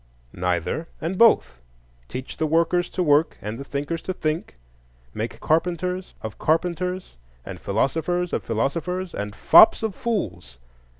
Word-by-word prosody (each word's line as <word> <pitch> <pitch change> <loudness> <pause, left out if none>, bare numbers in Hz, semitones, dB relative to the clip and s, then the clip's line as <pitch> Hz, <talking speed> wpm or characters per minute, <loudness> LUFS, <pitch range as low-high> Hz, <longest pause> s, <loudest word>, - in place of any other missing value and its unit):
Neither 90 - -1
and 170 +4 -3
both: 65 - +4 0.5
teach 130 - -7
the 160 - 0
workers 170 +3 +2
to 185 - -1
work 150 0 +3
and 105 +2 -6
the - - -5
thinkers 145 +4 -3
to 185 - -3
think; 155 - -3 0.6
make 115 +2 -4
carpenters 180 +3 -1
of 110 -1 -6
carpenters, 180 - -1 0.3
and - - -7
philosophers 165 - -1
of - - 0
philosophers, 170 +11 -2
and 100 0 -5
fops 220 - +7
of 220 -3 -1
fools. 105 - -3
160 Hz, 135 wpm, -24 LUFS, 115-180 Hz, 0.6 s, fops